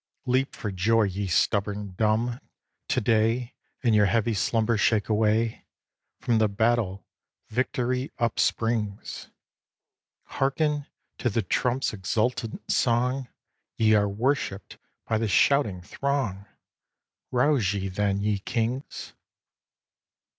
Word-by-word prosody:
Leap 130 +2 +1
for 105 -5 -4
joy, 110 +5 +2
ye 100 0 -2
stubborn 100 +2 0
dumb, 115 +4 +1 0.5
to - - +1
day, 115 +2 +1 0.3
And 120 -3 +3
your 105 -1 +5
heavy 115 +3 +1
slumber 115 +2 +1
shake 105 0 +2
away! 110 +1 +1 0.5
From 115 -2 +1
the 110 - +4
battle, 105 -2 0 0.4
victory 125 +2 -1
upsprings! 115 -2 -1 0.9
Hearken 145 +1 -1 0.3
to 120 - +1
the 115 +1 0
trump's 125 +6 0
exulting 115 +4 -1
song! 125 +2 +1 0.5
Ye 110 -1 +4
are 105 -1 +3
worshipped 110 -2 -2 0.3
by 110 -1 0
the 115 - 0
shouting 105 -3 +2
throng! 110 -3 -2 0.8
Rouse 125 -5 +2
ye, 95 -1 -2
then, 100 +1 0
ye 105 -1 0
kings! 120 +6 -3
110 Hz, 110 wpm, -26 LUFS, 105-125 Hz, 0.9 s, your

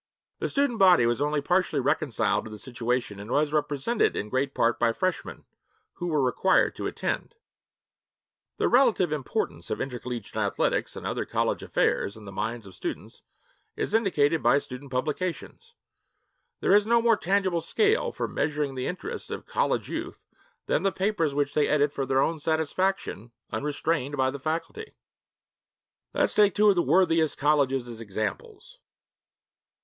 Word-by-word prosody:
The - - -2
student 275 -5 0
body 180 -10 +6
was 120 +3 0
only 150 0 +1
partially 180 -3 +1
reconciled 130 - 0
to - - -7
the 105 - -8
situation 120 -2 -2
and 105 +2 -9
was 150 +3 +1
represented 150 - +1
in 105 - -3
great 135 +3 -1
part 115 0 +2
by 115 -1 +2
Freshmen 185 +8 -3 0.5
[who 175 - -3
were 150 -5 +1
required 130 +9 +2
to - - -3
attend].' 465 - -3 1.2
The - - +1
relative 235 - +3
importance 150 -4 -3
of - - -2
intercollegiate 125 -4 -5
athletics - - 0
and - - -8
other - - -2
college - - -1
affairs, 100 - 0
in 110 - -12
the 100 - -8
minds 115 +3 -4
of 95 - -12
students, - - -6 0.5
is - - -3
indicated 165 -8 +2
by - - +4
student 135 0 -6
publications. 180 - -4 0.9
There - - +3
is 205 +1 +5
no 235 +1 +4
more 230 -1 +4
tangible 190 -3 +1
scale 430 - +1
for - - -3
measuring 145 -2 -1
the 130 -1 -3
interests 435 - -5
of - - -6
college - - 0
youth - - -6 0.4
than - - +1
the 195 - +1
papers 190 -8 0
which 145 0 0
they 150 - +2
edit 145 -1 +2
for 135 -2 -3
their 135 +1 +3
own 165 -1 -1
satisfaction, 160 - -1 0.2
unrestrained 145 -1 -2
by 130 0 +2
the 140 - -7
faculty. 165 - -4 1.2
Let - - +3
us - - +1
take 205 -2 +4
two 210 0 +5
of 200 - +4
the 175 - +3
worthiest 165 0 +2
colleges 140 -4 +2
as 115 -1 -8
examples. 440 - -5
150 Hz, 160 wpm, -27 LUFS, 130-190 Hz, 1.2 s, body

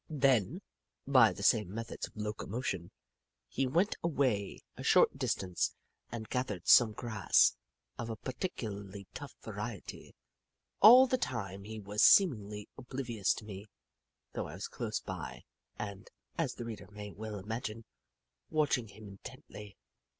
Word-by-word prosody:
Then, 135 - +2 0.4
by 130 -5 +6
the 100 - -7
same 105 -3 +4
methods 115 +2 -5
of - - -21
locomotion, 105 -3 -3 0.6
he 135 0 -1
went 170 +10 +1
away 130 - 0
a - - -9
short - - +4
distance 90 -2 -1 0.4
and 110 -2 -5
gathered 110 -9 -3
some 115 -3 +7
grass 110 -3 +3 0.4
of 115 - -4
a 115 - -3
particularly 105 - -5
tough - - -8
variety. - - -7 0.7
All 245 +5 +10
the 255 0 0
time 100 - -4
he 110 +1 -7
was 105 +1 -2
seemingly 105 - +5
oblivious 120 -6 -1
of 105 - -13
me, 100 0 -8 0.7
though - - -3
I - - -8
was - - -5
close - - -3
by - - -7 0.3
and, 100 -2 -6 0.3
as - - -1
the 120 - -6
reader 110 -5 -7
may 105 0 -8
well 110 +1 -6
imagine, 110 +2 -5 0.6
watching 150 -7 +1
him 105 +1 -12
intently. 100 +1 -11
110 Hz, 135 wpm, -32 LUFS, 100-130 Hz, 0.7 s, All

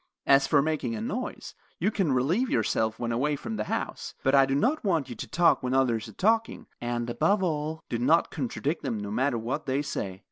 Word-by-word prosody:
As 135 0 +5
for 145 -2 +4
making 160 +9 -1
a - - -4
noise, 250 +3 -4 0.2
you 210 - +1
can 190 -8 0
relieve 165 - +1
yourself 110 0 0
when 120 -1 -2
away 145 +6 +1
from 110 -5 -5
the 105 0 -2
house, - - -4
but 135 - +2
I 135 -1 +6
do 135 - 0
not 260 - +1
want 165 - 0
you 120 - -6
to - - -6
talk 170 +2 +3
when 130 0 -1
others 120 -4 +1
are 110 - -11
talking, 225 +3 +1 0.2
and, 120 0 -2
above 195 - +1
all, 155 -2 -2
do 115 - -2
not 160 +8 +3
contradict 140 +2 -2
them, 110 - -2
no 105 0 -5
matter 130 +3 +1
what 125 +6 -3
they 135 +2 0
say." 95 -9 -4
140 Hz, 220 wpm, -27 LUFS, 120-165 Hz, 0.2 s, I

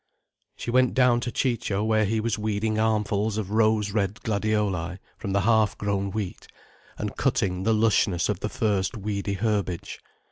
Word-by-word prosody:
She 120 - -4
went 130 0 +3
down 125 -2 +4
to 120 - -3
Ciccio 115 -5 -1
where 110 -1 +2
he 110 +2 0
was 110 -1 -1
weeding 110 +1 -1
armfuls 105 -1 +1
of 105 -2 -3
rose 110 -1 +2
red 100 -1 0
gladioli 100 -5 -1 0.2
from 100 - -4
the 100 +1 +2
half 110 0 +3
grown 100 -1 -1
wheat, 100 -2 -5 0.5
and - - -4
cutting 90 -1 0
the 110 - +3
lushness 105 -5 +2
of 105 -4 -1
the 105 - -3
first 105 -5 0
weedy 100 -1 -2
herbage. 100 -4 -2
105 Hz, 165 wpm, -26 LUFS, 100-110 Hz, 0.5 s, down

